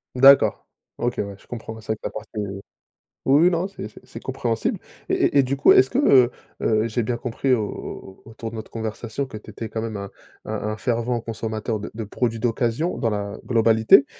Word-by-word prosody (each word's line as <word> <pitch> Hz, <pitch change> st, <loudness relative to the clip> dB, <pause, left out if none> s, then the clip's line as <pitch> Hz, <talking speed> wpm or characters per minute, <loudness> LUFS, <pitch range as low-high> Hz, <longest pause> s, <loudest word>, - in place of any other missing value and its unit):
D'accord. 135 Hz, +2 st, +6 dB, 0.3 s
OK, 120 Hz, -1 st, -1 dB
ouais, 100 Hz, -1 st, -3 dB
je -, -, -22 dB
comprends, 110 Hz, -2 st, -7 dB
c'est 110 Hz, -, -15 dB
vrai -, -, +1 dB
que -, -, -49 dB
tu -, -, -2 dB
as -, -, -8 dB
passé 110 Hz, 0 st, -8 dB, 1.0 s
oui, 140 Hz, +4 st, +5 dB
oui 180 Hz, -, +7 dB
non, 175 Hz, +2 st, 0 dB
c'est 195 Hz, -, -7 dB
c'est 110 Hz, -, -15 dB
c'est 115 Hz, -, -10 dB
compréhensible. 120 Hz, -3 st, -1 dB, 0.3 s
Et -, -, -1 dB
et -, -, +2 dB
et -, -, +6 dB
du 130 Hz, +2 st, -1 dB
coup, 140 Hz, -, +5 dB
est-ce 130 Hz, -, +6 dB
que, -, -, +1 dB
heu 125 Hz, -2 st, +6 dB, 0.3 s
heu, 110 Hz, 0 st, +2 dB
j'ai 115 Hz, +1 st, -1 dB
bien 120 Hz, +2 st, -1 dB
compris 125 Hz, +2 st, 0 dB
au 115 Hz, -4 st, +2 dB, 0.6 s
au -, -, -12 dB
autour 115 Hz, 0 st, -6 dB
de 115 Hz, -, -9 dB
notre 110 Hz, -1 st, -7 dB
conversation 115 Hz, +4 st, -4 dB
que 110 Hz, -, -8 dB
tu 110 Hz, -, -11 dB
étais 110 Hz, +2 st, -6 dB
quand 110 Hz, -, -3 dB
même 110 Hz, -1 st, -4 dB
un 100 Hz, -1 st, -5 dB, 0.4 s
un 110 Hz, -, -4 dB
un 105 Hz, 0 st, -2 dB
fervent 120 Hz, 0 st, 0 dB
consommateur 110 Hz, -1 st, -3 dB
de 105 Hz, -, -7 dB
de 110 Hz, +1 st, -4 dB
produits 115 Hz, +2 st, -1 dB
d'occasion, 120 Hz, +7 st, 0 dB
dans 115 Hz, -, 0 dB
la 100 Hz, -1 st, -3 dB
globalité, 115 Hz, +2 st, +5 dB
115 Hz, 225 wpm, -23 LUFS, 110-125 Hz, 1.0 s, oui